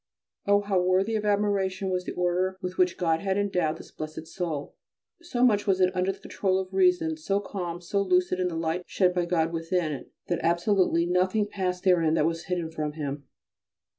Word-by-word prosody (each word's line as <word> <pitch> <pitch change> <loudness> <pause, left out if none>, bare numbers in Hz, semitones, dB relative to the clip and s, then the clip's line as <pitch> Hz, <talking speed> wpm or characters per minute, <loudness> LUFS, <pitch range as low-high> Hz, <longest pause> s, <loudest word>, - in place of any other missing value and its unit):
Oh, 205 0 +5
how 200 -3 +1
worthy 185 +4 +2
of 215 -1 -1
admiration 200 -2 0
was 180 0 -1
the - - -4
order 180 +1 0
with 180 0 -5
which 180 -1 +3
God 165 -2 +1
had 195 +1 -1
endowed 180 -6 0
this - - -13
blessed 155 +1 -7
soul! 165 -4 -4 0.5
so 255 -8 +1
much 210 -3 +2
was 190 -1 +3
it 185 0 +3
under 185 +1 +1
the 195 - -11
control 190 -2 -1
of 190 0 -4
reason, 180 -4 +3
so 195 +6 0
calm, 185 -4 -4
and 175 - -11
so 200 +3 0
lucid 185 -1 +2
the 165 - -5
light 165 +2 -1
shed 180 -2 +2
by 180 -1 0
God 165 -1 +1
within 165 0 -1
it 140 - -7 0.2
that 175 - 0
absolutely 170 0 +2
nothing 185 +4 +2
passed 185 -3 -3
therein 170 -4 +3
that 150 - +2
was 165 +1 -2
hidden 175 -3 -2
from 155 -2 -3
him. 140 -2 -5
180 Hz, 200 wpm, -27 LUFS, 165-195 Hz, 0.5 s, Oh